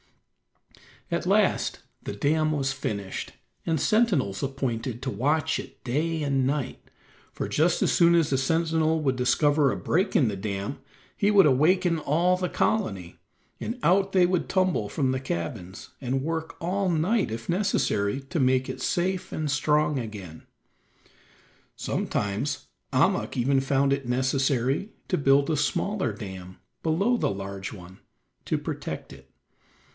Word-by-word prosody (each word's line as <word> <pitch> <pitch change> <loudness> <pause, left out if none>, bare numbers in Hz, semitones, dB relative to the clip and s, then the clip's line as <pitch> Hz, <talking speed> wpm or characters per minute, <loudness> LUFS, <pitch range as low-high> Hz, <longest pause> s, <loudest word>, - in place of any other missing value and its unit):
At - - -1
last - - +2 0.2
the - - -5
dam 155 +8 +1
was 135 -2 0
finished 100 -8 -4 0.3
and 160 -2 +1
sentinels 185 - +2
appointed 130 -3 -3
to 130 - -2
watch 155 +5 +1
it - - -10
day 155 +5 -1
and 135 -2 +1
night, 140 -1 -2 0.5
for - - -3
just 160 +4 +2
as - - +2
soon 170 0 +5
as 165 -4 +2
a 135 - +3
sentinel 160 +3 +1
would 135 -3 +1
discover 145 +3 +3
a - - -3
break 190 +4 0
in 130 - +4
the 100 -2 -2
dam 100 +5 -4 0.4
he 205 - +2
would 205 -2 +6
awaken 165 +5 +3
all 170 +5 +2
the 180 -1 -2
colony, 100 - -1 0.4
and 235 - -4
out 195 +2 +3
they 185 -2 +5
would 180 -1 0
tumble 185 - +1
from 135 -4 0
the 130 - -1
cabins, 90 -3 -5
and 130 0 -1
work 160 +1 -3
all 185 +3 0
night 180 - +1
if 115 +1 -6
necessary 155 - +1
to 160 +5 -4
make 130 -1 +2
it 130 - -5
safe 180 +6 -1
and 155 -2 -2
strong 150 +1 +2
again. 100 -8 -8 1.3
Sometimes 105 +8 -2 0.2
Ahmuk - - +1
even 135 +2 +3
found 135 +1 +1
it 140 -2 -3
necessary 130 - 0 0.2
to 180 - +2
build 140 0 +3
a 155 - +1
smaller 185 - 0
dam 95 -3 -8 0.2
below 195 +10 +2
the - - 0
large 95 0 -5
one 95 -2 -12 0.5
to - - 0
protect - - -5
it. 65 0 -15
140 Hz, 150 wpm, -26 LUFS, 120-165 Hz, 1.3 s, would